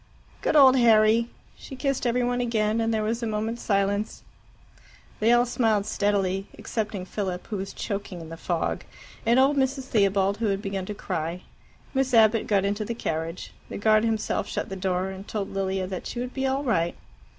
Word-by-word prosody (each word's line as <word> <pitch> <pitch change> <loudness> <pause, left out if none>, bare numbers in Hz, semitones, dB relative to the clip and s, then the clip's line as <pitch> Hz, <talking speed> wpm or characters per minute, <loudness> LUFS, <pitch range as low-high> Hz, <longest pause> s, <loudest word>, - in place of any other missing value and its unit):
"Good - - 0
old 265 -3 +8
Harry!" 225 -1 +5 0.3
She 270 - -10
kissed 270 -1 -1
every 245 +1 +1
one 245 0 0
again, 225 -2 +1
and 225 0 +1
there 220 -1 0
was 230 +2 -1
a 230 - -1
moment's 220 +2 -2
silence. 200 +1 0 1.0
They 220 +2 +4
all 240 0 +5
smiled 225 -4 +1
steadily, 195 -2 0
excepting 210 -4 -3
Philip, 185 -2 -4
who 210 - -4
was 195 +1 -5
choking 200 -4 -5
in 165 -1 -9
the 165 - -7
fog, 170 0 -2 0.4
and 235 +2 +5
old 275 +2 +4
Mrs. 265 0 +1
Theobald, 200 -4 +2
who 230 - +1
had 195 -1 0
begun 195 -2 -4
to 210 - -4
cry. 170 -2 -3 0.5
Miss 265 -2 +1
Abbott 220 0 +5
got 200 -2 +2
into 205 +2 -1
the 230 +2 -4
carriage. 165 -4 -4 0.2
The - - -5
guard 215 +1 +4
himself 225 -2 -1
shut - - -3
the 195 - -5
door, 185 0 -1
and 190 +1 -9
told 205 -3 -4
Lilia 190 -1 -1
that 185 -1 -5
she 240 - -5
would 250 +1 -4
be 265 0 -1
all 270 +2 0
right. 175 -10 +1
215 Hz, 195 wpm, -26 LUFS, 195-235 Hz, 1.0 s, old